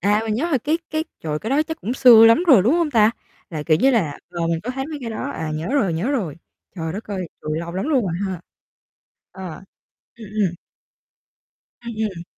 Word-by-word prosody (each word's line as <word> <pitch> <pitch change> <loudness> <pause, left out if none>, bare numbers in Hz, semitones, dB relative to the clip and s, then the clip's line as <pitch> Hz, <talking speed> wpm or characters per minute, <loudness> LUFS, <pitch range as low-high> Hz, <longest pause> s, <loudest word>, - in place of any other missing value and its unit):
à, 205 +3 +2
mình 215 -1 -1
nhớ 325 +9 -1
là 275 - +2
cái 310 +7 0
cái 315 +1 -1 0.2
trời, 150 -1 -3
cái 220 - -5
đó 290 +3 +3
chắc 320 +1 -7
cũng 240 +4 -3
xưa 235 -4 +8
lắm 230 +10 +5
rồi, 250 - +7
đúng 245 +9 +3
hông 335 -3 +1
ta? 220 -3 +5 0.4
Là, 155 -3 -4
kiểu 155 0 +3
như 270 - +5
là, 175 - 0
ờ, 170 -1 -2
mình 165 -1 -1
có 250 - -3
thấy 270 +2 -4
mấy 310 -1 -6
cái 235 -3 -5
đó, 215 - -4
à, 155 +2 -4
nhớ 155 +2 -4
rồi 215 -12 +2
nhớ 180 - -1
rồi. 190 - -2 0.4
Trời 160 -3 -4
đất 205 +5 -6
ơi! 190 -4 -5
Trời, 155 +1 -2
lâu 170 +1 -5
lắm 190 +5 -2
luôn 270 -6 +3
rồi 180 - -2
ha. 185 -3 -4 0.9
Ờ. 190 -2 -7 0.7
Ừm, 225 -2 -11
ừm. 200 -5 0 1.3
Ừm, 235 -1 -5
ừm. 195 -6 -3
215 Hz, 230 wpm, -21 LUFS, 170-260 Hz, 1.3 s, xưa